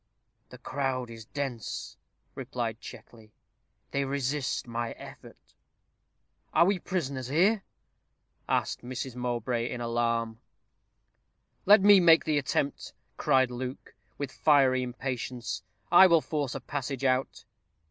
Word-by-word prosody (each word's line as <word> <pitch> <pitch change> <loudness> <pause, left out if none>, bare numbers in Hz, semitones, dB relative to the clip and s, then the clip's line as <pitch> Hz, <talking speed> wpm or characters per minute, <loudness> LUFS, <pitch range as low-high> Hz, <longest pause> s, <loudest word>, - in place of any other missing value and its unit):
"The - - -11
crowd 130 -3 -3
is 115 -2 -10
dense," 130 -4 -5 0.4
replied 120 -4 -4
Checkley. 110 -2 -13 0.6
"They 140 - 0
resist 140 0 -2
my 120 -1 -4
effort." - - -12 1.2
"Are - - +6
we 195 0 +1
prisoners 140 -9 -3
here?" 190 - +3 0.9
asked - - 0
Mrs. 125 0 -6
Mowbray, 120 -1 -2
in 125 - -5
alarm. 115 -1 -1 1.3
"Let 205 0 +8
me 200 0 +8
make 165 -2 +6
the 150 -2 +2
attempt," 140 +1 -2 0.2
cried 130 -4 +3
Luke, 125 +2 -6 0.2
with 140 -2 -4
fiery 135 -4 +3
impatience. 125 -1 -4 0.3
"I 185 +2 +9
will 170 -3 +4
force 145 -5 -3
a 135 - -5
passage 135 +1 -4
out." 130 0 0
130 Hz, 115 wpm, -28 LUFS, 120-145 Hz, 1.3 s, I